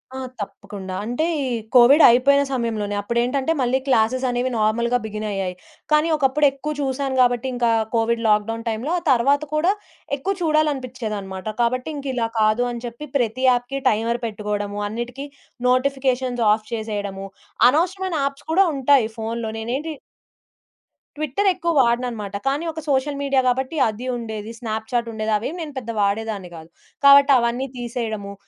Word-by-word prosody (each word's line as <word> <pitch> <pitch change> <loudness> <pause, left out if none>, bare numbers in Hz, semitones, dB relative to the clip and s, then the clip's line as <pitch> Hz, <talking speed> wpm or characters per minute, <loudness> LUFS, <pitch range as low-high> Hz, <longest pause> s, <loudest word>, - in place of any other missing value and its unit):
ఆ! - - -5 0.2
తప్పకుండా. 195 -2 -7
అంటే 245 +8 -1 0.2
ఈ - - -2 0.3
కోవిడ్ 255 +6 +7
అయిపోయిన 275 +4 +4
సమయంలోనే 220 -5 -2
అప్పుడేంటంటే, 245 +7 0
మళ్ళీ 255 +1 +1
క్లాసెస్ 255 +1 +2
అనేవి 245 +1 0
నార్మల్‌గా 235 +3 +1
బిగిన్ 215 0 -5
అయ్యాయి. 190 -2 -3 0.4
కానీ, 305 +1 +4
ఒకప్పుడు 290 +1 +2
ఎక్కువ 285 +3 -5
చూసాను 270 0 -2
కాబట్టి, 245 0 +2
ఇంకా 240 -1 +2 0.2
కోవిడ్ 230 0 +1
లాక్‌‌‌డౌన్ 220 +2 +1
టైమ్‌లో 225 +8 -3
ఆ - - -18
తర్వాత 275 +4 +3
కూడా 330 +5 +3 0.5
ఎక్కువ 380 +9 -1
చూడాలనిపించేదన్నమాట. 255 - -1
కాబట్టి, 255 +3 0
ఇంకా 280 -1 -5
ఇలా 235 -2 0
కాదు 215 +3 +3
అని 235 0 -7
చెప్పి, 235 +5 -7
ప్రతి 245 0 -1
యాప్‌కి 245 +2 0
టైమర్ 230 +2 0
పెట్టుకోవడము, 205 -1 -3
అన్నిటికీ 240 +5 -5 0.4
నోటిఫికేషన్స్ 255 -2 +1
ఆఫ్ 215 0 0
చేసేయడము, 205 -3 -4 0.4
అనవసరమైన 365 +5 0
యాప్స్ 275 0 -5
కూడా 385 +3 +5
ఉంటాయి. 270 -3 +4
ఫోనులో 225 0 -3
నేనేంటి 260 +8 -3 1.3
ట్విట్టర్ 310 +7 -1
ఎక్కువ 340 0 -1
వాడనన్నమాట. 235 -4 -1
కానీ, 280 +4 0
ఒక 315 - -6
సోషల్ 280 +1 0
మీడియా 275 -1 +2
గాబట్టి, 265 +5 0
అది 220 +4 -7
ఉండేది, 220 -2 -6
స్నాప్‌చాట్‌ 230 +1 -2
ఉండేది. 220 0 -2
అవేం 255 +10 -4
నేను 300 -3 -6
పెద్దగా 230 -4 -4
వాడేదాన్ని 200 -2 -2
గాదు. 160 0 -11 0.4
కాబట్టి, 280 0 +8
అవన్నీ 235 +2 -1
తీసేయడము, 225 -4 -4
245 Hz, 145 wpm, -22 LUFS, 220-275 Hz, 1.3 s, కాబట్టి